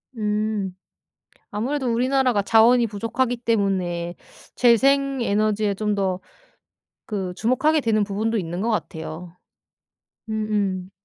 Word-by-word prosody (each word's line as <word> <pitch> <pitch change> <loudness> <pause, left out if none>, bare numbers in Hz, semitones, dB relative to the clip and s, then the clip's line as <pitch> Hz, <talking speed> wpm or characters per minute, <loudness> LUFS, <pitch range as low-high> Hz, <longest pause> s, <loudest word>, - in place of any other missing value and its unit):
음. 210 -3 -1 0.8
아무래도 255 +6 -2
우리나라가 250 -2 +2
자원이 230 +3 +5
부족하기 230 +4 -2
때문에 190 -7 -1 0.4
재생 275 +3 +3
에너지에 210 -1 +1
좀 210 +1 -1
더 190 -2 -1 0.9
그 190 -4 -3
주목하게 280 +8 +2
되는 220 -3 +2
부분도 215 +3 -1
있는 175 +1 -4
것 235 - 0
같아요. 165 -2 -5 0.9
음음. 205 -4 -1
215 Hz, 250 characters per minute, -23 LUFS, 195-235 Hz, 0.9 s, 자원이